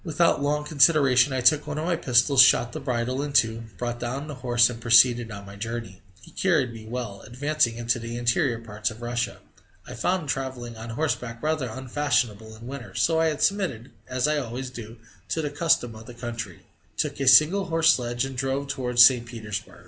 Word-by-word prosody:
Without 165 Hz, -3 st, +1 dB
long 150 Hz, +1 st, 0 dB
consideration 140 Hz, -3 st, +4 dB
I 130 Hz, -1 st, -1 dB
took 145 Hz, +4 st, +3 dB
one 150 Hz, 0 st, -4 dB
of 155 Hz, -, -3 dB
my 175 Hz, 0 st, +1 dB
pistols, 130 Hz, -1 st, +4 dB
shot 120 Hz, -1 st, +4 dB
the 155 Hz, -, -6 dB
bridle 130 Hz, -1 st, -2 dB
in 145 Hz, -1 st, -5 dB
two, 115 Hz, -3 st, +2 dB
brought 120 Hz, -1 st, -4 dB
down 125 Hz, +4 st, -4 dB
the 150 Hz, -, -6 dB
horse, 120 Hz, -1 st, +4 dB
and 120 Hz, -1 st, -7 dB
proceeded 120 Hz, 0 st, +4 dB
on 100 Hz, -2 st, -9 dB
my 100 Hz, 0 st, -11 dB
journey. 110 Hz, -2 st, -6 dB, 0.2 s
He -, -, -15 dB
carried 160 Hz, -10 st, 0 dB
me 110 Hz, -1 st, -11 dB
well. 115 Hz, -4 st, -6 dB
Advancing 135 Hz, -1 st, -1 dB
into 120 Hz, +1 st, -1 dB
the 115 Hz, +1 st, -6 dB
interior 120 Hz, +1 st, +1 dB
parts 110 Hz, -2 st, -4 dB
of 110 Hz, +2 st, -11 dB
Russia, 120 Hz, 0 st, -3 dB, 0.5 s
I -, -, -8 dB
found 180 Hz, -4 st, -1 dB
travelling 130 Hz, -3 st, -4 dB
on 110 Hz, +1 st, -9 dB
horseback 120 Hz, -2 st, -3 dB
rather 155 Hz, -5 st, -1 dB
unfashionable 120 Hz, -4 st, -2 dB
in 115 Hz, +2 st, -13 dB
winter, 120 Hz, -7 st, -9 dB
so 160 Hz, -1 st, +2 dB
I 160 Hz, -1 st, +1 dB
submitted, 165 Hz, -, -1 dB, 0.2 s
as 125 Hz, +2 st, -1 dB
I 150 Hz, 0 st, +1 dB
always 125 Hz, 0 st, -6 dB
do, 115 Hz, -1 st, -10 dB, 0.3 s
to 160 Hz, -, -2 dB
the 145 Hz, -, -3 dB
custom 145 Hz, -6 st, +1 dB
of 110 Hz, +1 st, -12 dB
the 120 Hz, -, -11 dB
country, 115 Hz, -6 st, -7 dB, 0.4 s
took -, -, -2 dB
a 135 Hz, -, -2 dB
single 155 Hz, +9 st, +6 dB
horse 165 Hz, -2 st, +4 dB
sledge, 120 Hz, 0 st, -2 dB
and 135 Hz, 0 st, -7 dB
drove 135 Hz, +2 st, -2 dB
towards 125 Hz, -3 st, +5 dB
St. 120 Hz, -2 st, +3 dB
Petersburg. 110 Hz, -4 st, -7 dB
125 Hz, 200 wpm, -25 LUFS, 115-145 Hz, 0.5 s, single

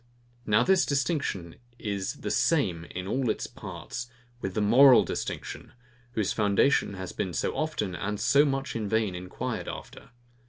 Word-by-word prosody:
Now 105 Hz, 0 st, +4 dB
this 190 Hz, -1 st, +4 dB
distinction 140 Hz, -, -1 dB, 0.2 s
is 100 Hz, -4 st, -3 dB
the -, -, -2 dB
same 95 Hz, -, +1 dB
in 90 Hz, +1 st, -6 dB
all 125 Hz, +5 st, 0 dB
its -, -, -1 dB
parts, 125 Hz, 0 st, -7 dB, 0.3 s
with 95 Hz, -1 st, -4 dB
the -, -, +1 dB
MORAL 125 Hz, +5 st, +7 dB
DISTINCTION, -, -, -5 dB, 0.4 s
whose 110 Hz, -5 st, 0 dB
foundation 105 Hz, +1 st, +2 dB
has 95 Hz, -1 st, -6 dB
been 90 Hz, -, -3 dB
so -, -, -1 dB
often, 150 Hz, -, -2 dB
and 105 Hz, +2 st, -3 dB
so 140 Hz, +6 st, +5 dB
much 135 Hz, -2 st, -1 dB
in 110 Hz, -3 st, -2 dB
vain, 110 Hz, -3 st, +1 dB
enquired 90 Hz, +1 st, -4 dB
after. -, -, -8 dB
105 Hz, 155 wpm, -28 LUFS, 95-135 Hz, 0.4 s, MORAL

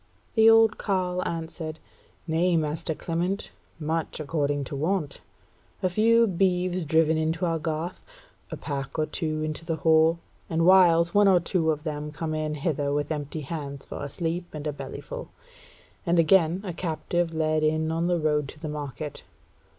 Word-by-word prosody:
The 220 Hz, 0 st, +6 dB
old 225 Hz, -1 st, +5 dB
carle 180 Hz, -2 st, 0 dB
answered: 160 Hz, -1 st, -5 dB, 0.5 s
"Nay, 170 Hz, +1 st, +2 dB
master 155 Hz, 0 st, -2 dB
Clement, 175 Hz, +5 st, -2 dB, 0.3 s
much 160 Hz, +1 st, -2 dB
according 145 Hz, -2 st, -1 dB
to 140 Hz, -, -6 dB
wont: 155 Hz, 0 st, -1 dB, 0.6 s
a 185 Hz, -, +2 dB
few 230 Hz, +4 st, +4 dB
beeves 180 Hz, -2 st, +1 dB
driven 160 Hz, +1 st, +3 dB
into 160 Hz, +2 st, 0 dB
our 165 Hz, -1 st, 0 dB
garth; 160 Hz, +2 st, -4 dB, 0.5 s
a -, -, -5 dB
pack 140 Hz, -1 st, -5 dB
or 155 Hz, -, +2 dB
two 155 Hz, -1 st, -3 dB
brought 155 Hz, 0 st, -2 dB
into 155 Hz, +1 st, -4 dB
the 165 Hz, -1 st, -2 dB
hall; 160 Hz, +1 st, +4 dB, 0.3 s
and 165 Hz, 0 st, +1 dB
whiles 170 Hz, -2 st, +6 dB
one 205 Hz, 0 st, +5 dB
or 185 Hz, -2 st, +6 dB
two 170 Hz, -1 st, 0 dB
of 150 Hz, -1 st, -1 dB
them 150 Hz, -1 st, -4 dB
come 155 Hz, +1 st, -4 dB
in 155 Hz, -1 st, -2 dB
hither 145 Hz, -2 st, -1 dB
with 145 Hz, +1 st, -1 dB
empty 150 Hz, 0 st, -3 dB
hands 140 Hz, -2 st, -6 dB
for -, -, -6 dB
a 145 Hz, -, -4 dB
sleep 170 Hz, +3 st, -3 dB
and 150 Hz, 0 st, -6 dB
a 150 Hz, -, -1 dB
bellyful; -, -, -7 dB, 0.8 s
and 175 Hz, -2 st, +1 dB
again 170 Hz, +1 st, +4 dB
a 185 Hz, -4 st, -4 dB
captive 170 Hz, 0 st, -1 dB
led 155 Hz, -1 st, +1 dB
in 155 Hz, +1 st, +1 dB
on 165 Hz, +1 st, 0 dB
the 175 Hz, -1 st, +1 dB
road 150 Hz, -2 st, +1 dB
to 150 Hz, -, -11 dB
the 155 Hz, -, -5 dB
market. 145 Hz, -1 st, -5 dB
160 Hz, 175 wpm, -26 LUFS, 155-175 Hz, 0.8 s, The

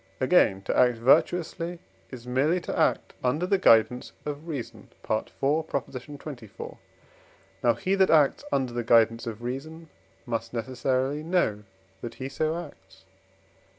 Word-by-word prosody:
Again, 95 Hz, 0 st, +3 dB
to -, -, -2 dB
act 125 Hz, -2 st, +4 dB
virtuously 170 Hz, +7 st, +2 dB, 0.3 s
is 125 Hz, -2 st, -10 dB
merely 140 Hz, +8 st, +1 dB
to -, -, -4 dB
act -, -, +1 dB
under 145 Hz, +8 st, +1 dB
the 195 Hz, +1 st, +2 dB
guidance 120 Hz, -2 st, +4 dB
of 150 Hz, +2 st, -5 dB
reason 140 Hz, -8 st, -6 dB
(IV. 110 Hz, -, -2 dB
xxiv.): 140 Hz, -4 st, -4 dB, 0.9 s
now 120 Hz, -1 st, +4 dB
he, 190 Hz, -, -1 dB
that 190 Hz, -1 st, +4 dB
acts 150 Hz, -, +4 dB
under 130 Hz, -3 st, 0 dB
the 120 Hz, 0 st, -2 dB
guidance 115 Hz, 0 st, +3 dB
of 115 Hz, 0 st, -6 dB
reason, 155 Hz, +6 st, -6 dB, 0.4 s
must 115 Hz, -1 st, -4 dB
necessarily 130 Hz, +4 st, -1 dB
know 155 Hz, -, 0 dB, 0.4 s
that 120 Hz, -, -7 dB
he 130 Hz, +2 st, -5 dB
so 155 Hz, +4 st, -1 dB
acts -, -, -19 dB
(II. -, -, -34 dB
130 Hz, 140 wpm, -27 LUFS, 120-155 Hz, 0.9 s, act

